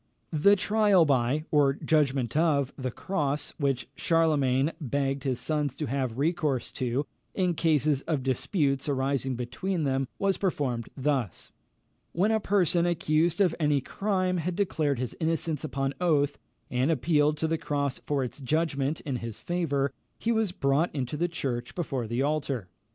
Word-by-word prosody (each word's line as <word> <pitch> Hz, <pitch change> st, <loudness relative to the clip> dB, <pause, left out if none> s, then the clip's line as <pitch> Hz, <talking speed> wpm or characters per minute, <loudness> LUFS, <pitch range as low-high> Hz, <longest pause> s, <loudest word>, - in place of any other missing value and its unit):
The 180 Hz, +7 st, +5 dB
trial 205 Hz, -3 st, +4 dB
by, 140 Hz, +2 st, +1 dB
or 145 Hz, -2 st, +4 dB
judgment 140 Hz, -5 st, +1 dB
of, 150 Hz, -4 st, +2 dB
the 130 Hz, -2 st, -3 dB
cross, 150 Hz, 0 st, -2 dB
which 135 Hz, -4 st, 0 dB
Charlemagne 150 Hz, -4 st, +2 dB
begged 140 Hz, 0 st, -1 dB
his 130 Hz, -3 st, 0 dB
sons 150 Hz, -4 st, -1 dB
to 155 Hz, -, -3 dB
have 130 Hz, -3 st, -2 dB
recourse 150 Hz, -4 st, 0 dB
to, 130 Hz, +2 st, -1 dB, 0.3 s
in 180 Hz, -2 st, +1 dB
case 155 Hz, -4 st, +2 dB, 0.2 s
of 150 Hz, -6 st, 0 dB
disputes 135 Hz, -, 0 dB
arising 135 Hz, -1 st, 0 dB
between 155 Hz, +9 st, -2 dB
them, 135 Hz, -1 st, 0 dB
was 195 Hz, -1 st, +1 dB
performed 135 Hz, -, -1 dB
thus: 135 Hz, -, -1 dB, 0.6 s
When 195 Hz, +6 st, +2 dB
a 220 Hz, -, +3 dB
person 180 Hz, -4 st, +2 dB
accused 165 Hz, +1 st, +1 dB
of 180 Hz, -4 st, +4 dB
any 150 Hz, -2 st, +3 dB
crime 185 Hz, +4 st, -1 dB
had 175 Hz, +1 st, -2 dB
declared 155 Hz, -8 st, 0 dB
his 125 Hz, 0 st, -3 dB
innocence 160 Hz, -2 st, -1 dB
upon 135 Hz, -2 st, -2 dB
oath, 145 Hz, -5 st, +2 dB, 0.3 s
and 130 Hz, +3 st, +1 dB
appealed 150 Hz, 0 st, +2 dB
to 160 Hz, -, 0 dB
the 165 Hz, 0 st, -1 dB
cross 140 Hz, -2 st, -1 dB
for 140 Hz, -2 st, -1 dB
its 125 Hz, -, -6 dB
judgment 145 Hz, 0 st, 0 dB
in 135 Hz, -4 st, -3 dB
his 115 Hz, -2 st, -6 dB
favour, 145 Hz, -6 st, -1 dB, 0.2 s
he 230 Hz, -, -1 dB
was 220 Hz, -4 st, +1 dB
brought 145 Hz, 0 st, +1 dB
into 130 Hz, 0 st, -2 dB
the 170 Hz, +4 st, +1 dB
church, 125 Hz, -8 st, -4 dB
before 135 Hz, -9 st, -2 dB
the 120 Hz, +4 st, 0 dB
altar. 140 Hz, -9 st, -1 dB
145 Hz, 155 wpm, -28 LUFS, 135-165 Hz, 0.6 s, The